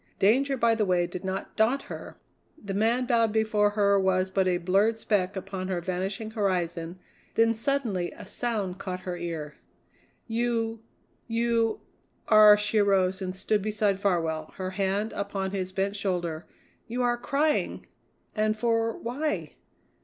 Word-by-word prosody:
Danger 270 +7 +3
by 230 -1 +3
the 225 -1 +1
way 180 -3 +2
did 175 +2 -7
not 190 0 -4
daunt 240 +6 +2
her; - - -9 0.4
the 200 -8 -6
man 230 +5 +2
bowed 230 -2 +2
before 215 -1 +2
her 200 -1 +3
was 190 0 +1
but 190 -1 +2
a 180 -1 +2
blurred 195 +6 +2
speck 205 -3 0
upon 190 -1 -5
her 185 -2 -1
vanishing 190 +5 -3
horizon; 175 -5 -1 0.4
then 230 0 +4
suddenly 225 -7 -1
a - - -11
sound 200 -3 -3
caught 185 -1 -5
her 180 -1 -4
ear. 165 -4 -5 0.7
"You 230 -1 -1 0.5
you 230 -1 +1 0.5
are" 215 -1 +8
she 210 +1 +1
arose 190 -2 +2
and 185 0 -3
stood 205 +2 0
beside 210 -1 0
Farwell, 165 -5 0
her 185 -1 -4
hand 195 +3 -1
upon 200 -1 -3
his 185 -2 -2
bent 195 +1 -1
shoulder 175 -5 -2 0.4
"you 245 +2 -2
are 240 0 +2
crying; 290 +5 0 0.5
and 215 0 +1
for 230 0 +1
why?" 285 +6 -3
200 Hz, 150 wpm, -27 LUFS, 185-225 Hz, 0.7 s, are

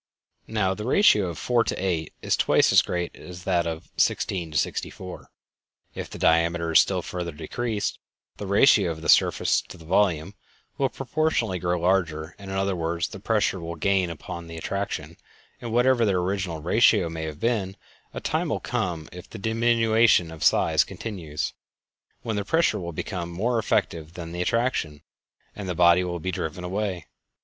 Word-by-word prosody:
Now, 105 -4 0
the 105 - -6
ratio 120 - +4
of 85 - -5
4 120 -2 +2
to - - -1
8 85 -4 -2
is - - +2
twice - - +3
as - - +7
great 90 -1 -3
as 90 -1 -10
that 85 -2 +1
of 80 -1 -6
16 85 -4 0
to 75 - -3
64. 90 +5 -4 0.6
If - - -6
the - - -8
diameter 85 0 +2
is 80 - +7
still - - +2
further 90 -2 -4
decreased, 110 +7 -3 0.4
the 100 - -6
ratio 100 -2 +5
of 80 -1 -5
the - - -3
surface - - +4
to - - -13
the 80 - -14
volume 90 -1 +1 0.5
will 135 -1 +2
proportionally 135 - -1
grow 90 0 0
larger; 85 -3 0
in 100 -1 -9
other 95 0 0
words, 85 0 -2
the 95 - -9
pressure 105 -2 +1
will 85 0 -6
gain 95 +1 +1
upon 85 +1 -7
the 85 0 -8
attraction, 85 -3 -4 0.4
and 120 - -5
whatever 125 +1 +3
their 100 -4 +2
original 90 -3 -2
ratio 105 0 +4
may 80 -1 -5
have 75 -1 -6
been, 105 -5 -1 0.3
a - - -5
time - - -1
will - - -1
come, 85 -4 -3
if 90 +1 -11
the - - -8
diminution 115 -4 +3
of 80 -2 -7
size - - +4
continues, 80 -10 -5 0.7
when 110 -2 -2
the 100 - -1
pressure 160 -2 +2
will 85 -2 -5
become 85 +1 -4
more 115 +8 0
effective 85 -6 -1
than 85 -2 -7
the 85 +1 -4
attraction, 90 - -1 0.5
and 100 -3 -6
the 90 - -2
body 85 +1 +5
will 90 -1 -3
be 95 +3 -3
driven 85 +1 -4
away. 95 -2 -3
90 Hz, 175 wpm, -25 LUFS, 85-105 Hz, 0.7 s, as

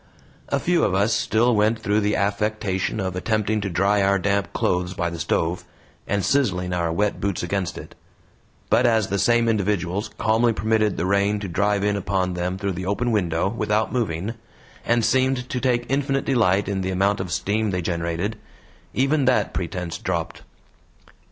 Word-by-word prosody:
A 140 - +1
few 175 +4 +1
of 95 - +1
us 100 +4 +2
still 120 +2 +2
went 105 +2 +2
through 105 -1 0
the 105 0 +1
affectation 100 -1 -1
of 95 -2 -2
attempting 110 +2 0
to 100 - -2
dry 100 +4 +2
our 100 0 +3
damp 100 +1 0
clothes 90 +1 -1
by 85 -1 -1
the 85 - -6
stove, 85 +2 -1 0.4
and 100 0 0
sizzling 95 -10 +1
our 85 -2 0
wet 105 +4 -1
boots 100 -3 -1
against 95 0 -2
it; - - -10 0.8
but 120 - +4
as 110 -3 +2
the 100 - 0
same 120 +1 +3
individuals 100 -3 0
calmly 115 +2 +2
permitted 110 -1 +1
the 90 - -1
rain 100 +2 +2
to 100 - -4
drive 100 +3 0
in 105 0 +1
upon 95 -2 -1
them 90 +1 -2
through 100 0 -2
the 90 +1 -5
open 120 +5 0
window 90 -5 +1
without 110 +1 -1
moving, 105 -3 -1 0.5
and 120 -1 +3
seemed 130 +1 +1
to 125 - -2
take 120 -1 +1
infinite 135 0 0
delight 100 -7 +2
in 95 -1 -1
the 95 - -2
amount 100 +2 +1
of 95 -2 -4
steam 105 +4 0
they 90 -2 -2
generated, 85 +5 -2 0.6
even 135 +2 +2
that 130 -1 +2
pretense 90 -1 -4
dropped. 85 -3 -3
100 Hz, 175 wpm, -23 LUFS, 90-110 Hz, 0.8 s, but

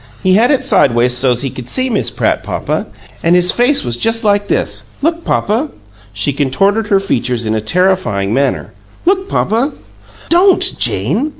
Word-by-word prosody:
He 185 - +3
had 225 +5 +4
it 270 -3 +1
sideways 125 - +3
so's 125 0 +1
he 135 - -3
could 125 0 -9
see 255 0 0
Miss. 230 -5 -1
Pratt, - - -1
papa. - - -3 0.3
An' 170 +1 +2
his 180 0 +4
face 250 +4 +2
was 120 -2 -2
just 225 - +2
like 205 -1 +1
this. - - -2 0.2
Look, 335 +2 0
papa!" 240 +5 -1 0.4
She 105 +7 -2
contorted 195 +11 0
her 200 -2 +3
features 125 - -2
in 110 - -1
a 110 - -1
terrifying 110 - 0
manner. 140 +2 -1 0.3
"Look, 385 +1 +1
papa!" 235 +8 0 0.6
"Don't, 365 +3 +4
Jane!" 285 +7 0
195 Hz, 170 wpm, -14 LUFS, -, 0.6 s, had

